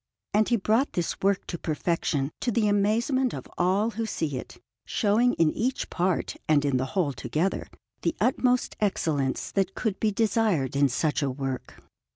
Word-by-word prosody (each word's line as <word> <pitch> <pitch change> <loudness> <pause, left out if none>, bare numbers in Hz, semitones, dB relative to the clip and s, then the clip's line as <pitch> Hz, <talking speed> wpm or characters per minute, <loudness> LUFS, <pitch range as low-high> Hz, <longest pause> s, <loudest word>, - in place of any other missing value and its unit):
And 215 +1 +3
he 240 - +4
brought 225 +6 +1
this 175 -2 -2
work 195 0 +1
to 170 - -5
perfection 155 -3 -1
to 245 - 0
the 215 -1 +2
amazement 230 +6 +2
of - - -7
all 195 +5 +2
who 225 +1 -3
see 160 -8 -2
it, 125 - -7 0.3
showing 230 +4 +2
in 160 -2 +3
each 255 +4 -2
part 180 0 0
and 145 -2 +4
in 140 -2 +2
the 130 - 0
whole 155 -7 +2
together 165 +8 -1 0.3
the 325 - 0
utmost 250 +1 +2
excellence 155 -9 0
that 195 -1 0
could 215 -5 -2
be 220 - +2
desired 210 - +1
in 140 0 +4
such 150 +5 0
a 140 - +1
work. 130 -1 -5
195 Hz, 175 wpm, -27 LUFS, 150-220 Hz, 0.3 s, he